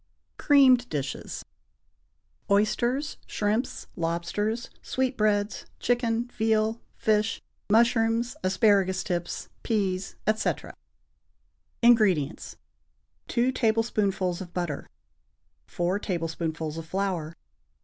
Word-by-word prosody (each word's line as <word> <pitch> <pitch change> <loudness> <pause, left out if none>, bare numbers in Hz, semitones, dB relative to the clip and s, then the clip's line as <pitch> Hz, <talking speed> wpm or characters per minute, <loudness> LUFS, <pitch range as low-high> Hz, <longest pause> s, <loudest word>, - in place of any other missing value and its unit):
=Creamed 260 -4 +5
Dishes.= 140 -3 -4 1.0
(Oysters, 240 +8 +1
shrimps, 215 +4 -1
lobsters, 175 +7 -2
sweetbreads, 215 -5 0
chicken, 240 -1 +1
veal, 220 0 +1
fish, 215 +1 +1 0.3
mushrooms, 230 +2 +3
asparagus 190 -1 +3
tips, 175 -2 -3
peas, 195 -4 -1
etc.) 215 0 0 1.1
INGREDIENTS. 200 - +3 0.7
2 245 +2 +2
tablespoonfuls 215 -7 0
of 175 -2 -9
butter. 175 -5 -3 0.8
4 175 +3 -1
tablespoonfuls 165 -4 -3
of 160 - -8
flour. 180 -4 -2
210 Hz, 75 wpm, -27 LUFS, 180-230 Hz, 1.1 s, =Creamed